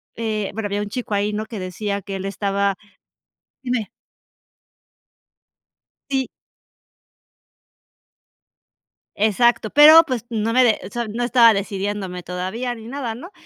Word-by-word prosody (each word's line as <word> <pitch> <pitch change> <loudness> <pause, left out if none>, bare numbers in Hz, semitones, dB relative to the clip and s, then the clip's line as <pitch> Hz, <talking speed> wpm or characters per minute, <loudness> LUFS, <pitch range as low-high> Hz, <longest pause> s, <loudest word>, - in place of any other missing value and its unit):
eh, 215 -3 -3
bueno, 220 -1 -3
había 205 +1 -2
un 205 - -6
chico 230 -2 -5
ahí, 205 +1 0
¿no?, 215 +1 -3
que 220 - -7
decía 200 +2 -4
que 195 -1 -5
él 190 - -6
estaba 200 0 -1 0.9
dime. 245 -5 -2 2.2
Sí. 265 -1 0 2.9
Exacto, 220 +2 +2
pero, 310 +3 +9
pues, 245 -4 -3
no 225 0 -1
me 255 +1 +4
de 220 -3 +3
o - - -7
sea, 235 -1 -3
no 235 +3 -3
estaba 240 -2 +6
decidiéndome 195 -2 -3
todavía 190 +8 -4
ni 225 -1 -12
nada, 245 -3 -4
¿no? 345 - -11
215 Hz, 130 wpm, -21 LUFS, 200-240 Hz, 2.9 s, pero